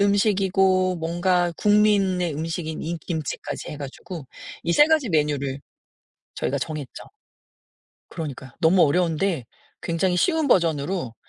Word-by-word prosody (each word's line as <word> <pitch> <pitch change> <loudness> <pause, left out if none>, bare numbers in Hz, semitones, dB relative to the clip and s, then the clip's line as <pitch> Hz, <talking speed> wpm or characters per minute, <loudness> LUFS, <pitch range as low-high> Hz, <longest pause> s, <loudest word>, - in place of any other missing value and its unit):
음식이고 190 -2 +2
뭔가 175 +1 +1
국민의 200 -5 +3
음식인 160 0 -4
인 170 +1 -3
김치까지 160 -5 -5
해 150 - -6
가지고 145 +2 -8 0.4
이 170 - 0
3 295 - +6
가지 310 -6 +2
메뉴를 145 -4 0 0.8
저희가 140 - -1
정했죠. 150 -1 -6 1.1
그러니까요. 140 -5 -7
너무 175 +2 +5
어려운데 165 - +1 0.4
굉장히 180 +2 0
쉬운 320 - +2
버전으로 165 - +1
170 Hz, 280 characters per minute, -24 LUFS, 155-190 Hz, 1.1 s, 3